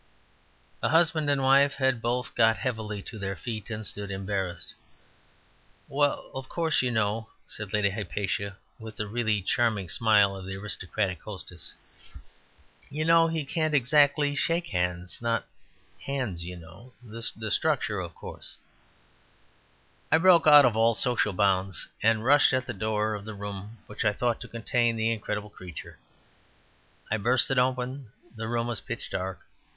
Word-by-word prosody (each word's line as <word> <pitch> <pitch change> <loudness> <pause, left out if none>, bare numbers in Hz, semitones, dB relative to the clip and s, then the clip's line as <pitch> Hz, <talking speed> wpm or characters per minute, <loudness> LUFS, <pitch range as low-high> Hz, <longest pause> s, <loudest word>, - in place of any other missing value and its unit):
The - - 0
husband 160 -2 +3
and 140 -1 +1
wife 140 +1 +5
had 130 -4 +1
both 120 +1 -2
got 115 0 +4
heavily 110 -5 -4
to 110 - -8
their 100 0 -3
feet, 110 +4 -6
and 110 -1 -5
stood, 100 0 -4
embarrassed. 95 -2 -4 1.1
"Well, 145 +1 0
of 130 0 -7
course, 165 -2 +1
you 125 - +1
know," 110 -1 -1 0.2
said 105 -2 -7
Lady 105 -1 +2
Hypatia, 100 -1 -3 0.2
with 110 -1 -9
the 105 - -3
really 110 -2 -1
charming 105 -3 0
smile 105 -2 +4
of 95 -1 -8
the 95 - -5
aristocratic 95 -1 -2
hostess. 95 -4 -7 1.1
"You 155 +2 -3
know 165 0 +5
he 160 -3 -2
can't 155 +1 0
exactly 145 +2 +4
shake 165 +4 0
hands... 90 0 -2
not 115 0 0 0.5
hands, 125 -11 -3
you 90 0 -7
know.... 85 +10 -14
The 110 -1 -5
structure, 125 -8 +1
of 90 -2 -6
course - - -9 0.8
" - - -36
I - - +6
broke 170 -1 +5
out 145 -2 +10
of 120 -3 +2
all 115 +1 +3
social 120 -3 +1
bounds, 95 -1 0
and 110 0 +2
rushed 145 +2 +6
at 130 -1 +1
the 120 - -5
door 110 +1 -1
of 105 -1 -5
the 110 0 -7
room 100 +2 -7
which 105 - -5
I 105 -2 +3
thought 120 +2 -1
to - - -6
contain 115 0 0
the 110 0 +1
incredible 105 -1 -4
creature. 90 -5 -10 1.1
I 110 - +2
burst 120 +5 +2
it 135 - +3
open; 130 -1 -1 0.2
the 110 0 -5
room 115 0 -1
was 120 -3 -3
pitch - - -5
dark. 95 0 -4
110 Hz, 160 wpm, -27 LUFS, 100-130 Hz, 1.1 s, out